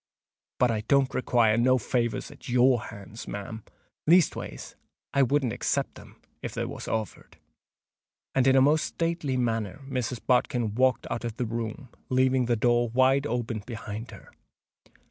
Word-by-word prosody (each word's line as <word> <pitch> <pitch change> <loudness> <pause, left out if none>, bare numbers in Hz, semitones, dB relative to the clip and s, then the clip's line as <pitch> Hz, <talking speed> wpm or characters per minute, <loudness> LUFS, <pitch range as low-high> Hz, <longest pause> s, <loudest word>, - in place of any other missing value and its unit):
But 125 -1 +3
I 110 -2 -1
don't 140 -1 +3
require 115 -3 +2
no 130 +2 +4
favours 120 0 -1
at - - -12
your 125 -1 +3
hands, 100 +1 -10
ma'am—leastways, 110 - -1 0.4
I 140 - +3
wouldn't 135 -3 +2
except - - -1
them - - -15 0.2
if - - -6
they - - -1
was - - -7
offered." 110 -2 -4 1.0
And 135 -1 +3
in 135 - +5
a 135 - +6
most 150 +3 +4
stately 165 -5 -2
manner 115 -2 -1
Mrs. 125 -2 -2
Bodkin 125 -3 +1
walked 130 +1 +2
out 115 - -3
of 115 -1 -5
the 125 - -1
room, 115 +4 -5 0.2
leaving 130 0 +3
the 120 - +2
door 120 +1 +2
wide 130 +4 +3
open 120 -3 -2
behind 110 0 -7
her. - - -13
125 Hz, 150 wpm, -27 LUFS, 115-130 Hz, 1.0 s, a